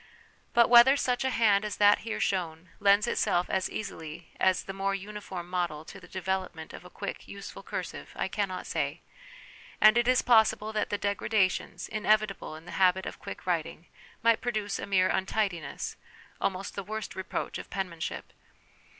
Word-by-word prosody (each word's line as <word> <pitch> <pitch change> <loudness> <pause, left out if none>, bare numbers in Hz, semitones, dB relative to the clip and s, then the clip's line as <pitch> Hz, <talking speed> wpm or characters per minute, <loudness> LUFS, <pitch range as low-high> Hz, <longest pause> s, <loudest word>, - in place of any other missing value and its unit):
But 235 -1 +7
whether 245 +3 +8
such 250 -2 0
a 265 - +1
hand 210 -5 +3
as 210 -1 -3
that 205 0 +6
here 225 -1 -4
shown 170 -2 -1
lends 200 +1 +5
itself 190 -6 +1
as 190 -1 0
easily 165 -5 -7
as 185 -1 +3
the 195 - -6
more 195 0 -1
uniform 195 -3 -7
model 175 -4 -2
to - - -10
the 180 - -14
development 185 -3 -3
of - - -9
a - - -12
quick, - - -6
useful - - -8
cursive, - - -6
I - - -1
cannot 190 -3 -3
say; - - -2 0.8
and 215 +2 +7
it 240 - +1
is 255 0 +4
possible 220 -2 +4
that 215 - 0
the 205 - 0
degradations, 200 -3 0
inevitable 215 -5 0
in 160 +1 -12
the - - -9
habit 185 0 +4
of - - -6
quick - - -8
writing, 170 -2 -2 0.4
might 230 -1 +4
produce 215 -4 -2
a - - -5
mere 185 -2 +3
untidiness, 190 -7 -2 0.4
almost 195 0 -2
the 200 - -4
worst 215 +1 -5
reproach 190 -1 -4
of - - -9
penmanship. 180 -5 -4
195 Hz, 170 wpm, -29 LUFS, 180-215 Hz, 0.8 s, whether